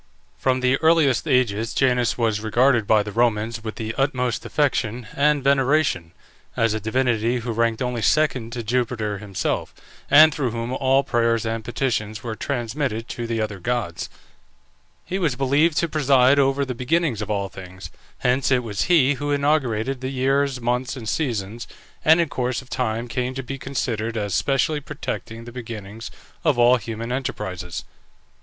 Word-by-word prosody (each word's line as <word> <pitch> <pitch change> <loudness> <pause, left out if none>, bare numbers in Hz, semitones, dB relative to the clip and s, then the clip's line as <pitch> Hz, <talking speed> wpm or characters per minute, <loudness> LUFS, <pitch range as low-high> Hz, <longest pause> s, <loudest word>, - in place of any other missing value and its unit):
From 130 -1 0
the 130 +1 +3
earliest 160 -4 +3
ages 115 -5 +1
Janus 125 -3 +2
was 110 -3 +1
regarded 120 +1 +2
by 110 -2 +4
the 105 - -6
Romans 115 0 0
with 110 -1 -5
the 110 0 -4
utmost 125 -3 0
affection 125 -5 0
and 145 -1 +2
veneration, 135 - +2 0.4
as 115 -2 +2
a 110 - -2
divinity 120 +1 0
who 120 0 -3
ranked 115 +1 0
only 125 -2 -2
second 130 -5 +1
to 120 - -4
Jupiter 110 -3 -1
himself, 100 -2 -3 0.3
and 155 +2 +8
through 135 -4 -1
whom 115 +2 -4
all 135 +1 +2
prayers 115 -3 +1
and 115 0 -2
petitions 110 -3 -2
were 115 -2 -4
transmitted 120 -2 -3
to 120 -1 -4
the 115 -1 -2
other 105 -3 -3
gods. 120 -5 -2 1.0
He 190 +3 -3
was 155 -9 +1
believed 140 +5 +2
to 170 - +2
preside 140 -3 +4
over 135 0 +2
the 130 - -4
beginnings 125 -1 0
of 105 - -5
all 100 -2 -1
things, 95 0 -10 0.3
hence 125 +2 +1
it 125 -2 +2
was 105 -4 -2
he 150 -6 +4
who 145 +1 -4
inaugurated 135 -4 0
the 130 - -3
years, 135 0 +1
months, 125 +1 -1
and 120 -4 -8
seasons, 115 -4 -2 0.4
and 160 +2 +6
in 170 - +2
course 125 -2 -2
of 130 - -22
time 115 -1 -1
came 125 +2 -3
to 135 - -4
be 135 +2 -6
considered 115 -4 -3
as 100 -2 -2
specially 145 +2 +1
protecting 125 -5 -6
the 120 - -9
beginnings 115 -2 -7 0.3
of 150 -6 +2
all 120 +1 +6
human 115 +1 -6
enterprises. 105 -9 -4
125 Hz, 165 wpm, -23 LUFS, 110-135 Hz, 1.0 s, and